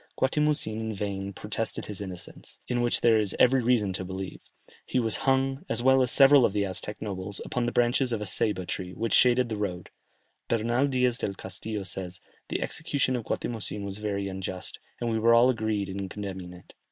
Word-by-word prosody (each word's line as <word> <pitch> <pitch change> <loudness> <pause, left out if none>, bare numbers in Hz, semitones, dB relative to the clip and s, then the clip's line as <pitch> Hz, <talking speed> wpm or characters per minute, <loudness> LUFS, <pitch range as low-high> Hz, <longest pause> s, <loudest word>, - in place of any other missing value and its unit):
Guatimozin 145 -5 +1
in 110 0 -3
vain 100 -1 -3
protested 105 +3 -3
his 105 -2 -6
innocence, 90 -3 -6
in 120 -1 0
which 120 0 +1
there 115 -2 +5
is 105 -3 0
every 130 +1 +5
reason 115 -5 +2
to 95 - -3
believe; 95 +1 -6 0.4
he 130 - -1
was 115 -3 0
hung, 135 +2 +1
as 120 - +1
well 130 0 +5
as 125 - +2
several 135 +1 +7
of 100 - +2
the 100 -1 +1
Aztec 100 +2 -3
nobles, 100 -1 -3
upon 120 -1 -1
the - - 0
branches 120 +2 +2
of 115 - -1
a 105 - -4
Ceyba 95 0 +1
tree, 90 0 -4
which 115 0 -2
shaded 125 0 +5
the 110 -2 -4
road. 90 -4 -4 0.6
Bernal 120 +4 +1
Diaz 125 -2 +1
del 100 - -2
Castillo 100 +3 -5
says, 90 -1 -5 0.3
"The - - -1
execution 145 -5 0
of 120 -3 -4
Guatimozin 105 -3 -3
was 100 +1 -5
very 100 -2 -2
unjust, 95 -1 -5 0.2
and 120 - -2
we 110 - 0
were 115 +1 +5
all 120 +2 +6
agreed 110 -4 -1
in 95 0 -5
condemning 95 -3 -6
it." 90 0 -15
110 Hz, 200 wpm, -27 LUFS, 95-125 Hz, 0.6 s, several